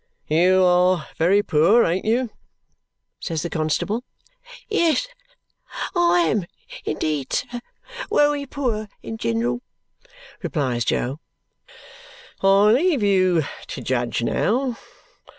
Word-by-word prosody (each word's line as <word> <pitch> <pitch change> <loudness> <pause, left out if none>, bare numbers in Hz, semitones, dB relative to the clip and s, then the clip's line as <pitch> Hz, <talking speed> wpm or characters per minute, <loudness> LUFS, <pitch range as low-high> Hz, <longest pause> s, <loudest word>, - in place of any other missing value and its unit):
"You 180 +4 +4
are 180 -2 +3
very 195 +5 +3
poor, 185 +8 +4
ain't 175 +3 -1
you?" 235 +1 +1 0.9
says 165 -3 -3
the 170 - -4
constable. 165 +9 -1 0.6
"Yes, 420 +2 +1 0.9
I 350 0 +4
am 215 - 0 0.4
indeed, 150 -3 -2
sir, 245 - -2 0.5
wery 290 -1 +2
poor 230 -7 -3
in 225 - -6
gin'ral," 120 - -1 0.8
replies 125 -7 -1
Jo. 135 +5 -1 1.2
"I 195 +2 +5
leave 285 - +2
you 185 -4 +3 0.2
to - - -6
judge 120 -2 -1
now! 245 - 0
190 Hz, 100 wpm, -22 LUFS, 155-245 Hz, 1.2 s, I